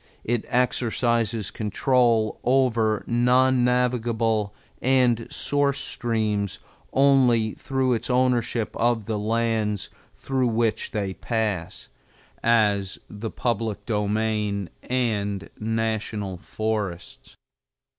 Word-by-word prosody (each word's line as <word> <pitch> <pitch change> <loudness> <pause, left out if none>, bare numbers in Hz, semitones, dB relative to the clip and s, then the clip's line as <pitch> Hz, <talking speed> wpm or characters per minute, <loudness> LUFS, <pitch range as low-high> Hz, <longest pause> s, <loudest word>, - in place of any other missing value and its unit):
It 120 0 -1
exercises 120 -3 0
control 115 0 +1
over 120 -4 +2
non 125 +2 +3
navigable 115 -4 +1 0.3
and 125 -3 +2
source 140 -1 +1
streams 110 -6 -1 0.3
only 130 -5 +4
through 130 -2 0
its 115 - -3
ownership 125 -3 +1
of 115 -2 +1
the 110 -1 -2
lands 110 -2 -1 0.2
through 130 -2 -1
which 115 -1 0
they 100 -5 -2
pass, 105 -6 -3 0.5
as 105 -4 +2
the 105 +2 -5
public 115 -3 -2
domain 105 -2 -1 0.2
and 105 -6 -1
National 110 -3 -2
Forests. 110 +5 -4
115 Hz, 90 wpm, -24 LUFS, 105-125 Hz, 0.5 s, only